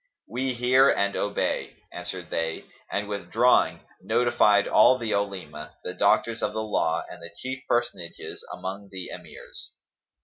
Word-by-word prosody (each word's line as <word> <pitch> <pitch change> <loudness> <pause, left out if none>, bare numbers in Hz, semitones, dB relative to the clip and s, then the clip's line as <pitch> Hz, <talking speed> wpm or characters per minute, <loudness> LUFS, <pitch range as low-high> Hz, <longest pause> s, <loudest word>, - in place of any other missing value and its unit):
"We 130 0 -2
hear 130 +3 +5
and 100 0 +1
we - - -2
obey," 100 0 -1 0.2
answered - - -6
they 80 0 -2 0.3
and 100 0 -1
withdrawing, 105 +5 +2 0.2
notified 120 -4 +3
all 130 - +6
the 115 -3 -3
Olema,[FN#274] 95 -6 -4
the 90 - -4
doctors 105 +4 +2
of - - -1
the 110 - -2
law 85 -6 0
and - - -11
the 85 - -8
chief 130 +1 -5
personages 120 -8 -2
among 100 +2 -6
the 95 -2 -6
Emirs. - - -11
100 Hz, 145 wpm, -26 LUFS, 95-120 Hz, 0.3 s, all